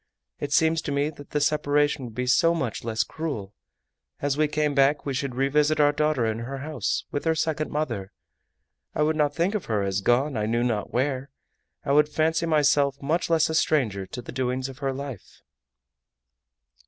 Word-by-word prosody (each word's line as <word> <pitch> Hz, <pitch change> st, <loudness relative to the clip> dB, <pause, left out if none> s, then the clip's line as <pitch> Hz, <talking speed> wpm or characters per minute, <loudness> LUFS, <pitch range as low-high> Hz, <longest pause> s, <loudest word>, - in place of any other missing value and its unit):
It -, -, -4 dB
seems 160 Hz, 0 st, +3 dB
to -, -, -4 dB
me 140 Hz, +2 st, 0 dB
that 145 Hz, -2 st, -13 dB
the 150 Hz, -, 0 dB
separation 145 Hz, -1 st, +1 dB
would 115 Hz, -2 st, -10 dB
be 125 Hz, -, -1 dB
so 165 Hz, +7 st, +4 dB
much 130 Hz, -9 st, -3 dB
less 110 Hz, -1 st, 0 dB
cruel! 135 Hz, -12 st, -5 dB, 0.7 s
As 145 Hz, -1 st, 0 dB
we 155 Hz, +1 st, +2 dB
came 150 Hz, 0 st, 0 dB
back 140 Hz, +1 st, +3 dB
we 140 Hz, -, -2 dB
should 130 Hz, -1 st, -3 dB
revisit 145 Hz, +3 st, +2 dB
our 145 Hz, -1 st, +5 dB
daughter 150 Hz, -4 st, +1 dB
in 110 Hz, 0 st, -1 dB
her 130 Hz, +4 st, -5 dB
house 140 Hz, -5 st, -2 dB
with 145 Hz, -, -2 dB
her 160 Hz, 0 st, +2 dB
second 155 Hz, -1 st, -1 dB
mother. 115 Hz, -11 st, -3 dB, 0.8 s
I 150 Hz, -, +2 dB
would 155 Hz, +1 st, +1 dB
not 145 Hz, -2 st, +1 dB
think 170 Hz, +5 st, +1 dB
of 210 Hz, -, -2 dB
her 105 Hz, -3 st, 0 dB
as 95 Hz, 0 st, -1 dB
gone 130 Hz, +6 st, +2 dB
I 105 Hz, -1 st, -1 dB
knew 120 Hz, +2 st, +1 dB
not 115 Hz, -4 st, -1 dB
where. 130 Hz, +2 st, -1 dB, 0.6 s
I 140 Hz, -, 0 dB
would 150 Hz, +1 st, +4 dB
fancy 160 Hz, +2 st, +1 dB
myself 145 Hz, -3 st, +3 dB
much 160 Hz, +6 st, -1 dB
less 165 Hz, -2 st, +3 dB
a 160 Hz, -, -3 dB
stranger 115 Hz, -12 st, +1 dB
to 125 Hz, -, -7 dB
the -, -, -8 dB
doings 130 Hz, +1 st, -2 dB
of 130 Hz, -, -11 dB
her 135 Hz, -2 st, -1 dB
life." 135 Hz, -5 st, -8 dB
145 Hz, 195 wpm, -25 LUFS, 125-150 Hz, 0.8 s, our